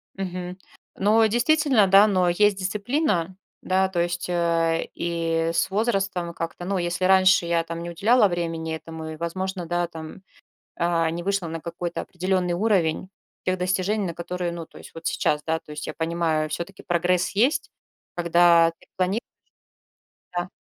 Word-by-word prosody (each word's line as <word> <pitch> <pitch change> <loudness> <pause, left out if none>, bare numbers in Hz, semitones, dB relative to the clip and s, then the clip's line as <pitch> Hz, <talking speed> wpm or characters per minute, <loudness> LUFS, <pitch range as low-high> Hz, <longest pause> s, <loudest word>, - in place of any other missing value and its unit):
Мгм. 180 -1 -5 0.4
Ну 215 +3 +4
и 220 - +4
действительно, 250 -2 +3
да, 195 +3 +7
но 185 -3 +2
есть 205 +3 +3
дисциплина, 195 - -1 0.3
да, 190 +1 +2
то 175 -2 0
есть, 175 0 -2
а, 165 -1 +1
и 165 -1 -1
с 165 - +1
возрастом, 195 -5 -1
как-то, 165 +1 -5
ну 195 +1 -1
если 175 +1 -1
раньше 185 -1 +5
я, 170 -1 +1
там, 165 0 -6
не 170 - -5
уделяла 210 +6 +4
времени 165 -2 -3
этому 160 0 -8
и, - - -6
возможно, 185 +2 -3
да, 175 +1 -1
там, 160 +2 -9 0.6
а, 170 -1 +1
не 170 +1 -4
вышла 195 -1 -1
на 165 0 -5
какой-то 170 +1 -4
определенный 180 -1 -1
уровень 185 -4 +1 0.4
тех 185 0 0
достижений, 185 +3 0
на 170 - -4
которые, 175 +1 -3
ну, 170 -2 -6
то - - -15
есть - - -13
вот 165 0 -9
сейчас, 150 0 0
да, 160 0 0
то - - -17
есть 150 +1 -6
я - - -5
понимаю, 160 -2 0
всё-таки 175 +5 -6
прогресс 175 +1 +1
есть, 260 +9 +1 0.5
когда 170 -1 +5
ты - - -21
планируешь. 190 +4 0 1.2
Да. 175 +1 -2
175 Hz, 165 wpm, -24 LUFS, 170-190 Hz, 1.2 s, да